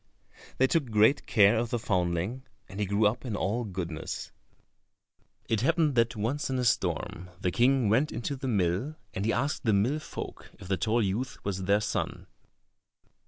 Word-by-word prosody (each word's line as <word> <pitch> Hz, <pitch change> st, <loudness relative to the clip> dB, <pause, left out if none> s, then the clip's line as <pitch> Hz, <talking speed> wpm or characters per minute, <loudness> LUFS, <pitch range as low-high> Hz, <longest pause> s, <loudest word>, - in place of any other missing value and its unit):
They 130 Hz, -, +5 dB
took 140 Hz, -2 st, +1 dB
great 110 Hz, +5 st, +3 dB
care 105 Hz, +1 st, +5 dB
of 120 Hz, 0 st, -1 dB
the 120 Hz, -, 0 dB
foundling, 95 Hz, +2 st, -1 dB, 0.3 s
and 95 Hz, +2 st, -9 dB
he 105 Hz, -, 0 dB
grew 100 Hz, +2 st, +2 dB
up 105 Hz, +4 st, +1 dB
in 120 Hz, -5 st, -3 dB
all 105 Hz, +5 st, -1 dB
goodness. 90 Hz, -6 st, -5 dB, 1.2 s
It 110 Hz, -2 st, +1 dB
happened 160 Hz, +2 st, +2 dB
that 115 Hz, 0 st, +2 dB
once 115 Hz, +8 st, -2 dB
in 130 Hz, -, -1 dB
a 125 Hz, -, 0 dB
storm, 90 Hz, -5 st, -1 dB
the 90 Hz, -, 0 dB
King 125 Hz, +2 st, +3 dB
went 125 Hz, +9 st, +2 dB
into 120 Hz, +5 st, -3 dB
the 135 Hz, 0 st, -5 dB
mill, 100 Hz, -, 0 dB, 0.2 s
and 95 Hz, -, -2 dB
he 115 Hz, -, +2 dB
asked 140 Hz, +7 st, -1 dB
the 110 Hz, -4 st, +2 dB
mill 120 Hz, +10 st, +2 dB
folk -, -, -8 dB
if -, -, -11 dB
the 95 Hz, -, +1 dB
tall 110 Hz, +6 st, +1 dB
youth 110 Hz, +7 st, -2 dB
was 95 Hz, -2 st, -2 dB
their 100 Hz, +2 st, +3 dB
son. 105 Hz, -, -3 dB
110 Hz, 180 wpm, -29 LUFS, 100-125 Hz, 1.2 s, They